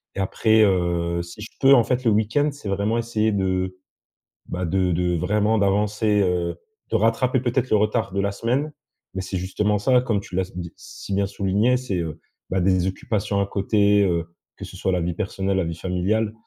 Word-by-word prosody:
Et - - -4
après, 110 +3 +3
heu, 85 -3 +1
si 85 +5 -10
je 105 - -6
peux, 135 0 +6
en 120 -4 +6
fait 125 +2 -1
le 115 - +3
week-end, 110 +8 +2
c'est 145 -6 -10
vraiment 100 +4 0
essayer 110 -2 0
de, 95 -2 -1 0.7
bah 90 +1 -3
de 90 +1 +1
de 90 +1 0
vraiment 105 +6 +1
d'avancer, 105 +1 +2
heu, 90 -2 0 0.3
de - - -1
rattraper, 115 +4 +2
peut-être, 125 +1 -1
le 110 - +4
retard 110 +1 0
de 100 - -1
la 100 0 0
semaine. 130 +9 -1 0.4
Mais 95 - -3
c'est 95 0 -4
justement 105 +3 0
ça, 125 +5 +3
comme 115 -5 0
tu 90 - -9
l'as 95 - +2
s 90 -1 -11
d 85 -2 -5
si 100 - -8
bien 100 0 +1
souligné. 100 +6 +1
C'est, 125 -7 -3
heu, 80 -2 -4 0.3
bah 95 - 0
des 95 0 +2
occupations 100 +1 -2
à 100 - +2
côté, 100 +1 +2
heu, 85 -3 0 0.3
que - - -7
ce - - -11
soit 95 - -1
la 90 - +1
vie 85 +1 -1
personnelle, 95 0 -2
la 95 - +1
vie 85 0 -4
familiale, 95 +5 -1
100 Hz, 210 wpm, -23 LUFS, 90-110 Hz, 0.7 s, peux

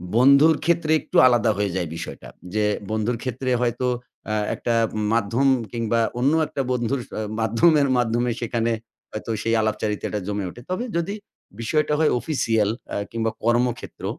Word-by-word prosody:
বন্ধুর 140 +6 +6
ক্ষেত্রে 170 -2 +2
একটু - - -2
আলাদা 120 -2 +3
হয়ে 100 -3 -1
যায় 90 -4 -2
বিষয়টা। 85 - -7 0.3
যে 105 0 +1 0.3
বন্ধুর 110 +2 0
ক্ষেত্রে 130 +1 -3
হয়তো 120 +1 0 0.4
আ - - 0 0.2
একটা 120 - -1 0.4
মাধ্যম 115 +4 +1 0.2
কিংবা 115 -1 0 0.2
অন্য 135 +5 +3
একটা 140 - -3
বন্ধুর 125 +2 0
স - - -31 0.3
মাধ্যমের 140 +7 +4
মাধ্যমে 120 0 +1
সেখানে 115 0 0 0.4
হয়তো 110 +1 -5
সেই 115 0 +1
আলাপচারিতাটা 105 -1 -2
জমে 100 -2 -2
ওঠে। 120 - -11
তবে 185 +6 -1
যদি 170 +4 -1 0.5
বিষয়টা 150 +6 +1
হয় 160 - +3
অফিসিয়াল, 115 -6 0 0.2
অ্যা - - -3
কিংবা 115 -1 -1
কর্মক্ষেত্র, 120 0 0
120 Hz, 150 wpm, -23 LUFS, 110-135 Hz, 0.5 s, বন্ধুর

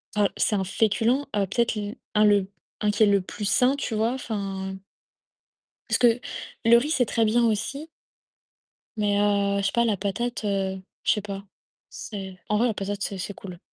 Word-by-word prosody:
heu 205 -1 +4
c'est 210 - +2
un 195 - 0
féculent, 225 +7 +1
heu, 200 -1 +2
peut-être 235 +4 +1
l 210 0 -4 0.2
un 210 - +5
le 205 -2 +4 0.3
un 210 -1 +2
qui 205 +2 +3
est - - +8
le 200 -1 +4
plus 205 +3 -6
sain, 250 +6 +3
tu 275 -5 -3
vois, 225 +3 +1
enfin 195 -6 -4 1.1
parce - - +2
que 240 -1 +4 0.5
le 235 +1 +8
riz, 285 +6 0
c'est 255 -6 +3
très 225 +1 +1
bien 235 +3 +3
aussi 265 +8 -2 1.1
mais 205 -1 +1
heu, 200 -1 +2
je - - -2
sais - - 0
pas 235 0 +3
la 220 -3 +2
patate, 225 +5 -3
heu, 195 -2 -1 0.2
je - - +3
sais 210 - +1
pas. 200 -1 -6 0.4
C'est 190 -3 -8
en 210 - +2
vrai 235 - +3
la 225 - 0
patate 200 0 -3
c'est 195 - -3
c'est 190 +2 -5
cool. 180 -3 -9
210 Hz, 195 wpm, -25 LUFS, 200-230 Hz, 1.1 s, est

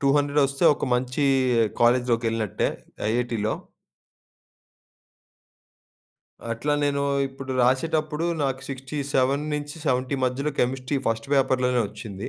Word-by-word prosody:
200 145 +1 +2
ఒస్తే, 140 +4 -1
ఒక - - -3
మంచి 130 +3 0 0.6
కాలేజ్‌లోకెళ్ళినట్టే, 115 -3 +2 0.4
ఐఐటీలో. 115 -2 0 3.0
అట్లా 120 +6 -1
నేను 140 0 0 0.3
ఇప్పుడు 135 0 -9
రాసేటప్పుడు, 155 +5 +1 0.2
నాకు 135 -1 -1
67-70 140 0 -1
మధ్యలో 135 +4 -1
కెమిస్ట్రీ 130 +2 0
ఫస్ట్ 115 +4 -2
పేపర్‌లోనే 130 -2 +2
ఒచ్చింది. 100 -3 -7
135 Hz, 85 wpm, -25 LUFS, 125-145 Hz, 3.0 s, 200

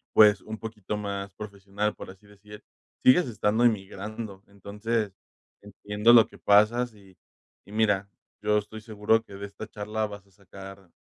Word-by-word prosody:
pues 105 -2 +7
un 110 0 -7
poquito 105 -2 -5
más 100 -1 -4
profesional, 100 0 -4
por - - -9
así 95 +2 -19
decir, 105 +1 -14 0.4
sigues 130 +4 +6
estando 110 +1 +1
emigrando. 105 -1 -2
Entonces, 105 +2 -3 0.5
entiendo 105 +2 +1
lo 115 -2 +8
que - - -16
pasas. 110 +4 +3
Y 95 -3 -19 0.5
y 100 - -15
mira, 100 -2 +1 0.3
yo 105 0 +2
estoy 105 +1 -5
seguro, 110 0 +1
que 100 - -12
de 100 +1 -6
esta 100 +2 -9
charla 105 +1 -3
vas 100 -1 -10
a - - -27
sacar 95 -1 -13
105 Hz, 160 wpm, -27 LUFS, 100-110 Hz, 0.5 s, lo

